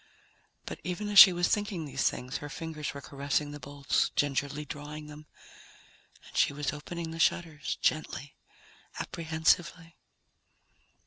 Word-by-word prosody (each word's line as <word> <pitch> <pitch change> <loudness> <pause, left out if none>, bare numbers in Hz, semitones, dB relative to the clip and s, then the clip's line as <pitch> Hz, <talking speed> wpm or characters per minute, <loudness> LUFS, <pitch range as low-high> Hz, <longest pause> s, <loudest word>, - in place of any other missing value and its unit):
But - - -6
even 180 +5 -3
as 205 -1 +7
she 195 - +12
was 175 0 +1
thinking 205 -6 -1
these 135 -1 +1
things, 130 +5 -5
her 145 - -7
fingers 155 -1 -5
were 140 - -6
caressing 140 +2 -2
the 145 - -8
bolts, 140 +1 0
gingerly 145 +1 0
drawing 150 +1 -7
them, 150 0 -12 1.0
and - - -16
she - - +3
was 145 0 -2
opening 165 +2 -6
the 165 - -7
shutters 160 -2 0
gently, 155 -2 -1 0.6
apprehensively. 165 +1 0
150 Hz, 135 wpm, -30 LUFS, 145-165 Hz, 1.0 s, she